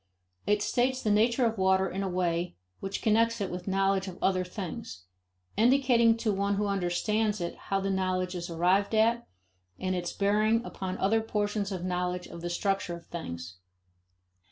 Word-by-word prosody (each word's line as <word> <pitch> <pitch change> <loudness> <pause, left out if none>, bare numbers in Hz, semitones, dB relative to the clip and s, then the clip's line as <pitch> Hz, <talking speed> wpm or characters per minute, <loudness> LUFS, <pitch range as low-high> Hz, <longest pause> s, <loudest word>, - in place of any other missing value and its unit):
It 210 0 +2
states 250 +4 +1
the 215 - +2
nature 235 +4 +3
of 225 -3 -1
water 190 0 +3
in 190 +2 -4
a 195 - -1
way 175 -1 -1 0.2
which 195 0 -4
connects 230 +1 +3
it 200 -2 -2
with 180 +2 -6
knowledge 195 0 +1
of 185 - -7
other 185 -1 +2
things, 175 - -7 0.5
indicating 235 -1 +4
to 225 -2 0
one 200 +1 0
who 205 +1 0
understands 205 +3 0
it 170 -1 -3 0.2
how 195 - +2
the 195 0 -1
knowledge 185 -1 0
is 175 -1 -5
arrived 185 +5 +2
at 230 +2 +2 0.5
and 185 0 -1
its 175 -1 -2
bearings 215 +3 +2
upon 185 -1 -5
other 220 +4 +2
portions 205 -2 -1
of 180 -2 -4
knowledge 180 0 -2
of 170 - -9
the 175 - -3
structure 195 0 -1
of 170 - -12
things. 85 - -7
195 Hz, 175 wpm, -29 LUFS, 180-215 Hz, 0.5 s, indicating